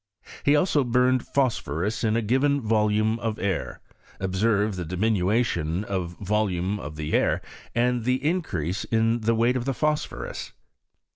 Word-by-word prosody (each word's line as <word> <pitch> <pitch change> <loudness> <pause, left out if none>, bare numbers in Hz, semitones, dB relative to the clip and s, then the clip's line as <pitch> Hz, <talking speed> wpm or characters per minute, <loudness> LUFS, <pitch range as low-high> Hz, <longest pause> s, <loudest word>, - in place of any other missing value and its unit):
He 145 - +4
also 150 -2 +3
burned 125 +1 +2
phosphorus 110 - -1
in 110 -1 +2
a 115 - 0
given 135 +6 +2
■volume 110 0 +2
of 115 -2 -2
air, 95 -3 -2 0.4
observed 100 +1 +1
tlie 85 - -4
diminution 95 -2 0
of 90 -4 -4
volume 100 -1 0
of 75 -4 -7
the 75 0 -4
air - - +2 0.4
and 120 0 +1
the 125 +3 0
increase 105 - -1
of 115 0 +2
the 115 0 +3
weight 120 +3 +2
of 125 -2 -2
the 135 -1 -1
phosphorus. 150 0 -2
110 Hz, 145 wpm, -25 LUFS, 95-125 Hz, 0.4 s, He